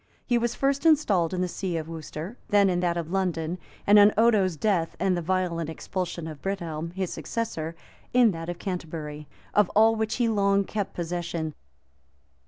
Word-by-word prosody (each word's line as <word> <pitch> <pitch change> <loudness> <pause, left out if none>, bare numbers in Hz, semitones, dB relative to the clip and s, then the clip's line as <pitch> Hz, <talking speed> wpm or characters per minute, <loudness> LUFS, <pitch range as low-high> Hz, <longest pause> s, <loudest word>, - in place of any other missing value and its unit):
He 240 -2 +2
was 235 0 -1
first 275 +1 +1
installed 225 - +3
in 185 -1 -1
the 180 - +1
see 180 -1 -3
of 160 -1 -4
Worcester, 165 +4 -7
then 200 -2 +4
in 175 - 0
that 175 -1 0
of 170 -1 -4
London,[] 180 -3 -1 0.3
and, 205 +1 +7
on 205 +1 +8
Odo's 210 -7 +3
death, 180 -3 0
and 190 -2 +2
the 175 - -1
violent 170 -2 -1
expulsion 175 0 -4
of 155 -3 -8
Brithelm, 170 -5 -3
his 190 -2 -2
successor, 170 -9 -4 0.4
in 245 -3 +5
that 165 -1 -6
of 175 - -4
Canterbury;[] 155 -5 -5 0.3
of 210 -3 +4
all 220 +2 +6
which 220 0 -1
he 240 -2 +1
long 200 -2 +3
kept 205 0 -4
possession. 170 -2 -3
185 Hz, 180 wpm, -26 LUFS, 165-210 Hz, 0.4 s, on